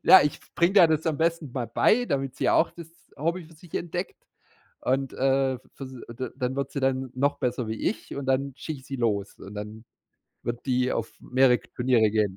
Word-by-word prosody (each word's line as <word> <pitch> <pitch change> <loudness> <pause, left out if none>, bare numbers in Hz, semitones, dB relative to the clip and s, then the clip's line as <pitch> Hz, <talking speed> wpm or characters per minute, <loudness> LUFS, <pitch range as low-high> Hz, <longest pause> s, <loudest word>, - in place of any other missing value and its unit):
Ja, 190 - +9
ich 145 - +1
f - - -23
bringe 175 +3 +3
der 185 -4 +9
das 160 0 +1
am 155 - +1
besten 165 -3 0
mal 125 -3 -2
bei, 220 - +3
damit 135 -4 -1
sie - - +1
auch - - +4
das 170 -2 -10 0.3
Hobby 170 +5 -1
für 165 - -17
sich 170 +1 -17
entdeckt 175 +2 -3 0.6
und, 135 +1 0
äh, 135 -1 +2 0.2
v 135 - -7
s 130 - -9 0.2
da 130 +1 -3
dann 130 0 -2
wird 140 - -2
sie 140 - -2
dann 130 -1 0
noch 140 +3 +1
besser 125 -2 -1
wie 110 - -2
ich - - -8
und 140 -1 -4
dann 135 +1 +1
schicke 150 -2 -5
ich 130 - -18
sie 135 - -4
los 105 -4 -1
und 100 +2 -10
dann 105 +2 -7 0.6
wird 120 0 -3
die 125 -1 +2
auf 115 - -2
mehrere 130 -1 +4
Turniere 120 -3 +2
gehen. 105 -3 +1
135 Hz, 220 wpm, -26 LUFS, 125-155 Hz, 0.6 s, Ja